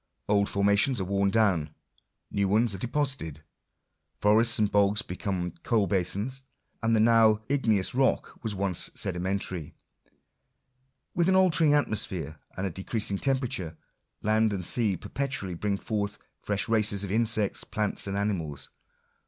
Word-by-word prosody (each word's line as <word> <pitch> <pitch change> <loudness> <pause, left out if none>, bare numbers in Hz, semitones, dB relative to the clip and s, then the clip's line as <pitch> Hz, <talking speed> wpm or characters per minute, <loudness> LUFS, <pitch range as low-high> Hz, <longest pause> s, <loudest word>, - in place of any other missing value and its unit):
Old 100 -1 +2
formations 100 +5 +2
are - - -1
worn 100 +1 +1
down; 95 -8 +1 0.6
new 100 -1 +1
ones 110 +2 +2
are 95 - -4
deposited. 120 - -2 0.8
Forests 110 +3 +4
and 105 -2 +1
bogs 105 +2 +3
become 90 -1 -3
ooal 105 +3 0
basins; 100 +8 -1 0.4
and 115 -1 +2
the - - +3
now 110 -1 +4
igneous 110 -9 +1
rock 130 +1 0
was 110 -3 -3
once 95 -2 +1
sedimentary. 90 -2 -2 1.4
With 175 +1 +2
an 190 - +4
altering 165 -5 +4
atmosphere, 95 - -1 0.2
and 95 - -2
a 95 - -2
decreasing 100 +2 -3
temperature, 125 - -2 0.5
land 110 0 +2
and 90 -3 -3
sea 105 -4 +2
perpetually 115 -1 -3
bring 100 +3 -1
forth 105 -1 -3 0.2
fresh 100 -1 -1
races 105 -3 +2
of 100 - -4
insects, 110 -2 0
plants, 105 -1 -2
and 100 0 -2
animals. 85 -9 -2
105 Hz, 135 wpm, -27 LUFS, 95-115 Hz, 1.4 s, Forests